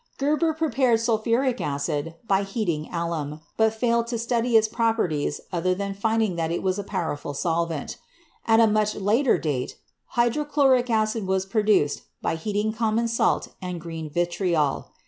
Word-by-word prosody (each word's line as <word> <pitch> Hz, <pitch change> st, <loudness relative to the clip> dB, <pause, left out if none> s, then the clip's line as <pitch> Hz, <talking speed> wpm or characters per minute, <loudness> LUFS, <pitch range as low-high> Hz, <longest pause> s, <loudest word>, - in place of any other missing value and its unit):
Geber 305 Hz, +3 st, +1 dB
prepared 260 Hz, -7 st, +2 dB
sulphuric 235 Hz, +3 st, +1 dB
acid 145 Hz, +3 st, -2 dB
by 195 Hz, -1 st, +3 dB
heating 195 Hz, -7 st, -2 dB
alum, 165 Hz, -3 st, -3 dB, 0.2 s
but 220 Hz, 0 st, +3 dB
failed 235 Hz, +1 st, +1 dB
to 235 Hz, 0 st, -2 dB
study 235 Hz, 0 st, +2 dB
its 220 Hz, 0 st, +3 dB
properties 220 Hz, -11 st, 0 dB
other 180 Hz, +1 st, +1 dB
than 200 Hz, +1 st, -3 dB
finding 220 Hz, -2 st, 0 dB
that 165 Hz, -1 st, -1 dB
it 170 Hz, -, -2 dB
was 190 Hz, +1 st, 0 dB
a -, -, -3 dB
powerful 160 Hz, -7 st, -3 dB
solvent. 165 Hz, -1 st, -2 dB, 0.5 s
At 225 Hz, 0 st, +5 dB
a 230 Hz, -, +7 dB
much 215 Hz, -1 st, +1 dB
later 225 Hz, +7 st, +2 dB
date, 135 Hz, -5 st, -3 dB, 0.4 s
hydrochloric 265 Hz, 0 st, +3 dB
acid 220 Hz, -2 st, 0 dB
was 190 Hz, 0 st, +1 dB
prepared 205 Hz, -7 st, +2 dB, 0.2 s
by 165 Hz, -, -1 dB
heating 210 Hz, +5 st, -1 dB
common 225 Hz, +1 st, 0 dB
salt 230 Hz, -, +1 dB
and 180 Hz, -2 st, -4 dB
green 165 Hz, -2 st, -6 dB
vitriol. 170 Hz, -2 st, 0 dB
210 Hz, 150 wpm, -25 LUFS, 170-230 Hz, 0.5 s, a